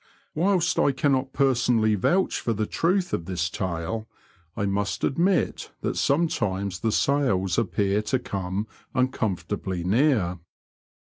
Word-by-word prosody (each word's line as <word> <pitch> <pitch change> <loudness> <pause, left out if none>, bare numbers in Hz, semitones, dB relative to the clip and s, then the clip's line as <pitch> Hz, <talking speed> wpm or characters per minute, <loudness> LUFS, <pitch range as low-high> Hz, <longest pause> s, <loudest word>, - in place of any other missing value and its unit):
Whilst 180 +2 +2
I 140 - +3
cannot 135 -1 +1
personally 125 -5 +2
vouch 175 - +1
for 115 - -1
the 110 0 -1
truth 180 - 0
of 85 - -1
this 90 -1 -2
tale, 95 +5 -3 0.5
I 100 - 0
must 100 0 -1
admit 175 +5 +1
that - - -2
sometimes 100 - 0
the 115 - 0
sails 105 -10 +1
appear 100 -2 +1
to 110 +5 0
come 100 -3 -3 0.3
uncomfortably 100 -7 -1
near. 100 - +2
110 Hz, 125 wpm, -25 LUFS, 95-135 Hz, 0.5 s, I